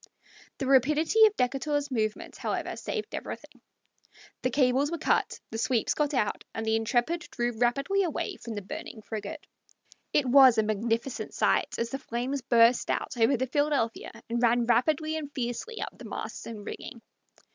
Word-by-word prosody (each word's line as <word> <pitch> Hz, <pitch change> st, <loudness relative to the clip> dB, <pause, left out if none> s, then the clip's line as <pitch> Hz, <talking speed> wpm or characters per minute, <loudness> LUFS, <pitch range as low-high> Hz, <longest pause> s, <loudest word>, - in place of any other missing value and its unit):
The 270 Hz, -, -3 dB
rapidity 305 Hz, -, +5 dB
of 425 Hz, -, -3 dB
Decatur's 285 Hz, +2 st, -1 dB
movements, 215 Hz, -3 st, -2 dB
however, -, -, -2 dB
saved 435 Hz, -3 st, -5 dB
everything. -, -, -7 dB, 0.8 s
The 255 Hz, -, +1 dB
cables 265 Hz, +2 st, +2 dB
were 340 Hz, -, -3 dB
cut, 315 Hz, -, 0 dB
the 225 Hz, -, -4 dB
sweeps 230 Hz, -1 st, +1 dB
got 295 Hz, -1 st, 0 dB
out, 210 Hz, -, 0 dB
and 225 Hz, -, -3 dB
the 220 Hz, 0 st, +2 dB
Intrepid 245 Hz, +10 st, 0 dB
drew 240 Hz, -5 st, -1 dB
rapidly 275 Hz, -, +1 dB
away 345 Hz, -6 st, -2 dB
from 230 Hz, -2 st, -7 dB
the 205 Hz, -, -5 dB
burning 215 Hz, +3 st, -8 dB
frigate. 215 Hz, -1 st, -6 dB, 0.7 s
It 290 Hz, -, +2 dB
was 260 Hz, -2 st, +7 dB
a 220 Hz, -, +4 dB
magnificent 225 Hz, +4 st, -2 dB
sight -, -, +1 dB
as 235 Hz, 0 st, -2 dB
the 270 Hz, -, -3 dB
flames 260 Hz, +2 st, -3 dB
burst 235 Hz, -1 st, +4 dB
out -, -, -1 dB
over 240 Hz, +3 st, +3 dB
the 260 Hz, -, 0 dB
Philadephia 285 Hz, -4 st, 0 dB, 0.2 s
and 235 Hz, +1 st, -1 dB
ran 240 Hz, 0 st, +3 dB
rapidly 310 Hz, +7 st, +2 dB
and 290 Hz, -2 st, -6 dB
fiercely 260 Hz, -, -4 dB
up -, -, -7 dB
the -, -, -11 dB
masts -, -, -6 dB
and 215 Hz, -3 st, -8 dB
rigging. 235 Hz, -, -8 dB
250 Hz, 170 wpm, -28 LUFS, 230-290 Hz, 0.8 s, was